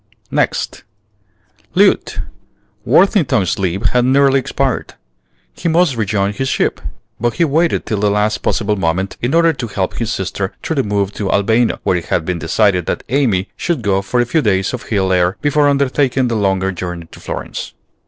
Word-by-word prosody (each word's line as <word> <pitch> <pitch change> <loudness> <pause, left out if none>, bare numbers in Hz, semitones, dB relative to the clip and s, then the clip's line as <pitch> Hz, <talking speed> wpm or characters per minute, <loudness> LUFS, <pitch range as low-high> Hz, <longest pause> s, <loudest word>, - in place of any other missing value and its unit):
NEXT. - - -1 0.9
Lieut. - - +3 0.6
Worthington's 150 - +3
leave 95 +1 -1
had 125 0 +2
nearly 135 +1 +4
expired. 130 - -2 0.6
He 170 - -2
must 165 -4 +3
rejoin 105 -2 0
his 135 +5 -2
ship; - - 0 0.4
but 120 0 0
he 170 - +3
waited 160 +3 +1
till 110 - -2
the 105 0 +2
last 105 +1 +1
possible 105 0 0
moment 95 +1 -1
in 125 +6 0
order 165 -1 +4
to 130 -4 -5
help 95 -3 -3
his 115 -2 -2
sister 95 +1 -3
through 160 - -2
the 135 - +2
move 100 -2 -1
to 100 -3 -3
Albano, 110 +4 +2
where 90 - +1
it 85 - -5
had 80 - -1
been 90 -1 -2
decided 90 +2 +1
that - - -2
Amy 115 -8 +1
should 170 -9 -2
go 95 -2 +1
for 100 +6 -1
a 120 - +3
few 155 +6 +1
days 95 -3 +1
of 125 - -4
hill 95 -3 +1
air 90 0 +2
before 145 0 +2
undertaking 135 -2 +1
the 115 - -1
longer 95 -2 +1
journey 90 -2 -6
to - - -12
Florence. - - -6
105 Hz, 180 wpm, -17 LUFS, 95-135 Hz, 0.9 s, nearly